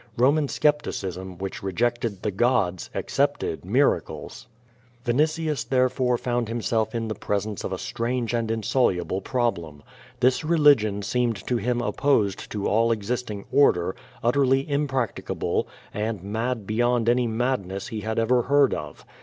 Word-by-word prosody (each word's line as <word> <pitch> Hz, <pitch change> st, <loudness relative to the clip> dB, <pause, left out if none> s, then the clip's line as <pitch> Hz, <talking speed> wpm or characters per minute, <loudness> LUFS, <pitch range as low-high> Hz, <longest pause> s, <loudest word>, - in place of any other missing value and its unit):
Roman 140 Hz, +5 st, +3 dB
scepticism, 95 Hz, -, -1 dB
which 95 Hz, +1 st, -5 dB
rejected 115 Hz, +1 st, -1 dB
the 105 Hz, -, 0 dB
gods, 95 Hz, -4 st, +1 dB
accepted -, -, -1 dB
miracles. -, -, 0 dB, 0.6 s
Vinitius, 150 Hz, +1 st, +1 dB
therefore, 125 Hz, 0 st, +1 dB
found 120 Hz, -1 st, -1 dB
himself 115 Hz, -1 st, -1 dB
in 115 Hz, -1 st, -2 dB
the 110 Hz, -, -2 dB
presence 105 Hz, 0 st, -3 dB
of -, -, -3 dB
a 95 Hz, -, -2 dB
strange 120 Hz, +3 st, -2 dB
and 115 Hz, -2 st, 0 dB
insoluble 110 Hz, -5 st, 0 dB
problem. 85 Hz, -, -2 dB, 0.4 s
This 130 Hz, +4 st, +3 dB
religion 145 Hz, -11 st, +4 dB
seemed 120 Hz, +1 st, 0 dB
to 125 Hz, -, 0 dB
him 120 Hz, +1 st, 0 dB
opposed 110 Hz, -7 st, +1 dB
to 105 Hz, -2 st, -2 dB
all 115 Hz, +2 st, +3 dB
existing 110 Hz, -1 st, -3 dB
order, 95 Hz, -10 st, +3 dB, 0.3 s
utterly 135 Hz, +2 st, +3 dB
impracticable, 140 Hz, -5 st, -1 dB, 0.3 s
and 105 Hz, -3 st, -3 dB
mad 110 Hz, +2 st, -2 dB
beyond 120 Hz, +2 st, +1 dB
any 120 Hz, 0 st, +3 dB
madness 110 Hz, -5 st, -2 dB
he 110 Hz, -3 st, -4 dB
had, 110 Hz, +1 st, -3 dB
ever 120 Hz, +2 st, +3 dB
heard 140 Hz, +2 st, +3 dB
of. 75 Hz, -1 st, -7 dB
115 Hz, 135 wpm, -25 LUFS, 105-125 Hz, 0.6 s, religion